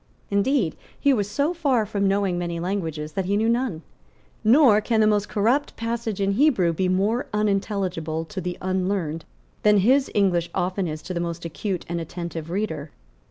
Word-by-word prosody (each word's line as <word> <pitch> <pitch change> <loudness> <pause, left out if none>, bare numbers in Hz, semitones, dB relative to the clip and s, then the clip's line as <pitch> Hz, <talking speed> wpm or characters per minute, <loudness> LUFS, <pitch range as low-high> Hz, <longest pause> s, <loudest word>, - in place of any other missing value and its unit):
Indeed, 200 - +1 0.2
he 280 - +4
was 205 -5 0
so 285 +10 0
far 275 -10 +1
from 200 -1 0
knowing 195 -2 +1
many 170 -1 -3
languages, 165 -4 -3
that 195 +1 -2
he 200 +2 +1
knew 220 +2 +1
none; 230 -8 0 0.6
nor 225 -2 +6
can 225 +1 +1
the 215 - +5
most 205 -1 +2
corrupt 240 +8 +1
passage 230 -2 -3
in 195 0 +1
Hebrew 200 - +3
be 185 +2 0
more 205 +7 +1
unintelligible 195 -6 -1
to 190 +2 -6
the 180 0 -4
unlearned 185 -4 -1 0.4
than 210 0 +5
his 260 +8 +3
English 180 -4 +2
often 185 +1 -1
is 155 0 -5
to 185 - -5
the 170 - -2
most 170 0 -4
acute 180 +3 -3
and 170 0 -3
attentive 165 -1 -6
reader. 170 -6 -3
195 Hz, 175 wpm, -24 LUFS, 170-215 Hz, 0.6 s, nor